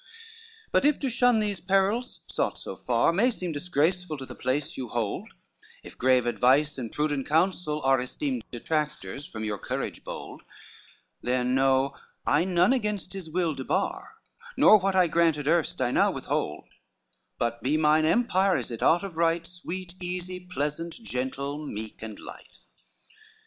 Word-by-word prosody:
IV - - -36
"But - - +3
if 295 0 +3
to 270 -3 0
shun 245 0 +4
these 205 -2 -1
perils, 195 +6 +1
sought - - -1
so - - -7
far, - - +2
May 220 +8 +4
seem 185 -8 -4
disgraceful 165 +1 0
to 135 - -7
the - - -9
place 145 +4 -2
yon 125 -3 -5
hold; 115 -4 -2 0.5
If - - -11
grave 130 -1 +3
advice 135 +4 +3
and 115 -4 -5
prudent 145 -2 -1
counsel 160 -1 +1
are 135 -1 +4
Esteemed 130 -1 -3
detractors 150 +2 -3
from 110 -1 -6
your 105 -2 -2
courage - - -4
bold; - - -8 0.8
Then 125 0 0
know, 135 +1 +3 0.3
I - - +3
none 180 +4 +4
against 210 -6 -2
his 190 -4 -7
will 170 -1 0
debar, 350 - -2 0.4
Nor 215 - +8
what 195 0 0
I 185 -1 +6
granted 165 -3 +2
erst 165 0 +1
I 125 -1 +1
now - - +4
withhold; - - -3 0.7
But 120 0 -1
he 145 +4 +1
mine 155 0 +4
empire, 190 +1 +3
as 125 -2 -5
it 115 - -6
ought 175 +4 +4
of 185 -5 -7
right, 165 0 +2
Sweet, 180 +1 -8
easy, 180 0 -4
pleasant, 165 -2 -4
gentle, 140 - -3
meek 110 -6 -7
and 110 -2 -7
light. - - -12
160 Hz, 160 wpm, -27 LUFS, 135-185 Hz, 0.8 s, Nor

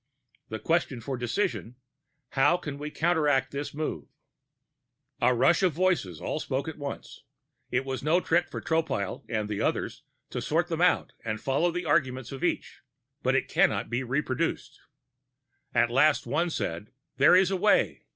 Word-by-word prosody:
The 110 - -3
question 160 -3 0
for 135 +3 -4
decision: 125 - -2 0.5
How 145 +5 +3
can 145 -5 -7
we 150 +1 -4
counteract 150 -4 +1
this 140 +1 -4
move?" 155 +1 -4 1.1
A 125 - +5
rush 135 +9 +4
of 185 -4 +3
voices 165 - 0
all - - -3
spoke 135 -1 -2
at 160 -1 -6
once; 140 -1 -7 0.5
it 130 +2 0
was 135 -1 -3
no 155 +5 +3
trick 175 0 +1
for - - -5
Tropile 160 - -1
and 110 -2 -1
the 105 -1 -3
others - - -1 0.3
to - - -3
sort 170 +3 0
them 165 0 -2
out 180 0 +2
and 110 -1 -3
follow 140 +8 +1
the 180 +1 -3
arguments 130 -5 0
of 135 - -7
each, - - -2 0.4
but - - +1
it - - +1
cannot - - +1
be 120 +2 0
reproduced. 130 +1 -2 0.9
At 120 0 +2
last, 145 +4 +4
one 150 +8 0
said: 105 - -3 0.3
"There - - +6
is 185 0 +4
a - - +1
way. 205 +3 +2
145 Hz, 165 wpm, -28 LUFS, 125-170 Hz, 1.1 s, There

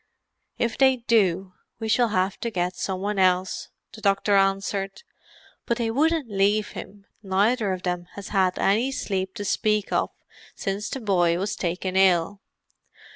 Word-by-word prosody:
"If 235 -1 -1
they 265 -1 +6
do, 195 -6 +1 0.3
we 225 - -3
shall 240 +2 +3
have 190 -2 0
to 235 - -2
get 180 -3 -2
some 190 -1 -3
one 205 0 -1
else," 185 0 +1 0.2
the 215 - -11
doctor 200 0 +2
answered. 195 - 0 0.6
"But 235 - +1
they 230 -2 -1
wouldn't 310 +2 +1
leave 205 +1 +1
him; 200 0 -10 0.2
neither 205 +2 +1
of 185 -1 -4
them 180 -1 -2
has 200 -1 -8
had 190 -3 +1
any 225 +7 +2
sleep 190 -6 -3
to 205 -3 -5
speak 210 0 0
of - - +1 0.5
since 200 +1 -3
the 265 - -5
boy 175 -5 +2
was 200 +3 -2
taken 185 +1 -3
ill. 190 +1 +3
195 Hz, 160 wpm, -25 LUFS, 190-220 Hz, 0.6 s, they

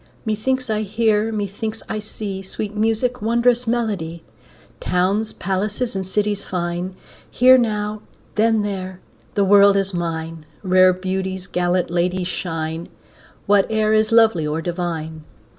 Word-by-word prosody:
Methinks 255 +4 -1
I 215 -1 0
hear, 215 +1 +1
methinks 215 +1 -4
I 215 - -3
see, 205 -2 -5
Sweet 205 +2 -5
music, 225 +3 0
wondrous 235 +2 +2
melody, 200 -9 -2 0.6
Towns, 195 +5 0
palaces, 205 +5 -2
and 190 -1 -3
cities 205 +1 -1
fine; 175 +1 -3 0.3
Here 255 +1 +6
now, 210 -3 0 0.3
then 220 0 +2
there; 190 -2 -4 0.4
the 200 -2 +3
world 200 0 +6
is 195 -1 0
mine, 165 -2 -4 0.2
Rare 185 -1 +5
beauties, 190 0 -3
gallant 175 -1 0
ladies 180 +1 0
shine, 165 -2 -4 0.6
Whate'er 215 +2 +2
is 215 +1 +3
lovely 225 -9 +4
or 150 +2 -1
divine. 165 -2 -4
200 Hz, 125 wpm, -21 LUFS, 180-220 Hz, 0.6 s, Here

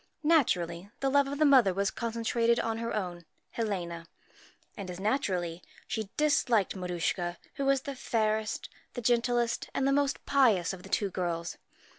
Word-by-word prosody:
Naturally, 190 - +2
the 270 0 0
love 280 0 +4
of 280 +1 -4
the 305 - +4
mother 250 -10 +5
was 200 +2 +1
concentrated 230 0 0
on 225 0 -1
her 230 0 -3
own 180 -4 -3 0.3
Helena, 175 -7 -3 0.7
and, 195 -2 -6
as 180 0 -6
naturally, 185 -6 -1 0.3
she 220 -3 -3
disliked 250 -10 +2
Maruschka, 175 -1 -2 0.2
who 275 - -3
was 275 -1 +3
the 280 +1 -5
fairest, 220 -3 -1 0.3
the 245 - -3
gentlest, 240 0 +1
and 270 - +1
the 275 - +3
most 285 -1 0
pious 220 -11 +3
of 185 - -8
the - - -12
two 200 -2 0
girls. 170 -2 -3
220 Hz, 160 wpm, -30 LUFS, 180-260 Hz, 0.7 s, mother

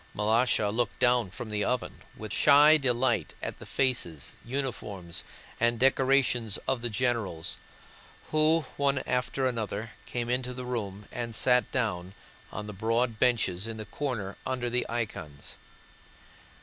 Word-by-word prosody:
Malásha 110 0 +2
looked 120 0 0
down 125 -4 +3
from 110 +3 -7
the 105 -1 0
oven 125 -1 -2 0.2
with - - -6
shy 150 +2 +7
delight 125 - +1
at - - -5
the - - -10
faces, 120 - -1
uniforms, 110 -9 -4 0.4
and 120 0 +2
decorations 130 -4 +3
of 135 -3 0
the 120 - -2
generals, 110 -8 -1 0.7
who 155 +1 +4 0.2
one 140 -1 +1
after 125 +1 0
another 115 -3 -2 0.2
came 120 -1 -3
into 125 +1 -1
the 125 0 -5
room 105 -5 -4
and 115 -2 -4
sat 125 +1 +3
down 100 -7 -2 0.4
on 105 - -5
the 105 - -7
broad 115 +3 0
benches 110 -6 +2
in 115 -1 -5
the 110 - -6
corner 105 -4 -3
under 125 -2 -2
the 125 +1 0
icons. 85 -11 -5
120 Hz, 140 wpm, -29 LUFS, 105-125 Hz, 0.7 s, shy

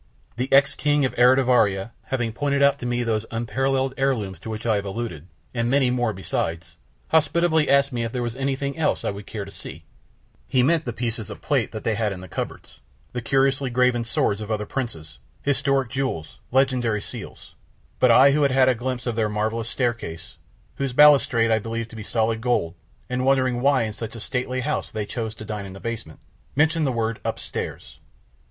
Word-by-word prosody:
The 125 +3 -3
ex 140 +1 +6
King 145 -1 +2
of 130 - -2
Eritivaria 125 -5 +4
having 120 -4 -2
pointed 140 +2 +1
out 140 0 +4
to 125 - -4
me 120 0 0
those 110 -1 -1
unparalleled 130 +3 0
heirlooms 110 -10 -1
to 110 - -8
which 110 +1 -5
I 110 -3 +3
have 100 - -3
alluded, 95 -6 -5 0.3
and 115 -1 0
many 135 -1 +3
more 120 -2 +1
besides, 85 -3 -3 0.3
hospitably 160 0 +3
asked 140 0 +4
me 120 -1 -1
if 115 - -3
there 125 0 -2
was 120 -1 -3
anything 135 +1 -2
else 160 - +1
that - - 0
I - - -1
would 100 0 -9
care 105 -3 -5
to 100 - -11
see, - - -9 0.6
he 130 -1 +2
meant 160 +3 +2
the 120 - -2
pieces 115 -2 -3
of - - -9
plate - - +1
that - - -6
they 115 - +1
had 110 -1 0
in 95 - -6
the 95 - -9
cupboards, - - -6 0.3
the 125 - -3
curiously 135 +2 +1
graven 125 -1 +2
swords 110 -3 0
of 105 - -6
other 105 -1 -1
princes, 80 - -5 0.2
historic 140 -2 +1
jewels, 130 - -3
legendary 125 -4 +2
seals, - - -9 0.5
but 130 - +5
I 130 +4 +7
who 150 +2 +2
had 140 -2 +3
had 130 0 +5
a - - +4
glimpse 125 +1 -4
of 120 -2 -1
their 110 -2 +1
marvelous 110 +2 -1
staircase, 120 -10 -3 0.4
whose 135 -2 -2
balustrade 130 -5 +5
I 110 - +4
believed 115 +1 -4
to - - -10
be 110 - -6
solid 110 +1 0
gold 120 -9 0 0.3
and 125 0 -2
wondering 130 -2 +2
why 135 -2 +3
in 110 -1 -3
such 110 +1 -6
a - - -7
stately 125 +3 -2
house - - -2
they 110 -1 -3
chose 110 0 -4
to 110 - -9
dine 105 -2 -5
in 95 - -9
the 95 - -10
basement, 115 -9 -6 0.3
mentioned 160 +1 +3
the - - +1
word 115 -2 -1
"upstairs." - - -5
120 Hz, 205 wpm, -24 LUFS, 110-135 Hz, 0.6 s, I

